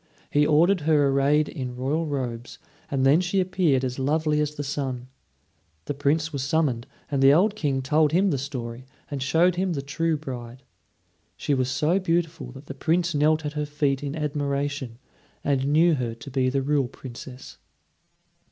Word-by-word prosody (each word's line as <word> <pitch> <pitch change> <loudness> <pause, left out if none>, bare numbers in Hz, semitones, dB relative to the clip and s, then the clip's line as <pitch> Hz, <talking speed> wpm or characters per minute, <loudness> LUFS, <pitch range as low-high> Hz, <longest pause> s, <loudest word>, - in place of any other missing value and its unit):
He 145 0 +3
ordered 170 +5 +4
her 145 -2 +3
arrayed 140 +2 +3
in 125 -5 -5
royal 145 +6 -1
robes; 125 -4 -4 0.3
and 135 -1 0
then 145 +6 +5
she 185 +2 0
appeared 180 -7 +2
as 125 +1 -4
lovely 150 +2 +1
as 150 0 -2
the 145 - -4
sun. 135 -3 -4 0.8
The - - -2
Prince 150 +3 0
was 140 - -2
summoned; 135 -4 0 0.2
and 140 -1 0
the 135 0 +7
old 195 +8 +3
King 140 -8 -1
told 150 +3 +3
him 185 +3 +3
the 140 - -1
story, 125 -3 -6 0.2
and 140 -2 -3
showed 165 +6 +3
him 185 -1 0
the 140 - -2
true 160 +3 -1
bride. 125 -3 -8 0.7
She 145 - -1
was 130 -2 +1
so 155 +7 +1
beautiful 165 -6 -1
that 135 +2 -12
the 140 - -7
Prince 170 +4 0
knelt 155 +1 +2
at 150 - -3
her 150 -1 -2
feet 145 -2 0
in 145 0 -4
admiration, 145 -4 -2 0.5
and 135 -1 +1
knew 165 +3 +5
her 120 -5 -2
to 115 +4 -11
be 130 -1 +1
the 135 +1 0
real 140 -2 +1
Princess. 130 0 -10
145 Hz, 180 wpm, -25 LUFS, 130-155 Hz, 0.8 s, the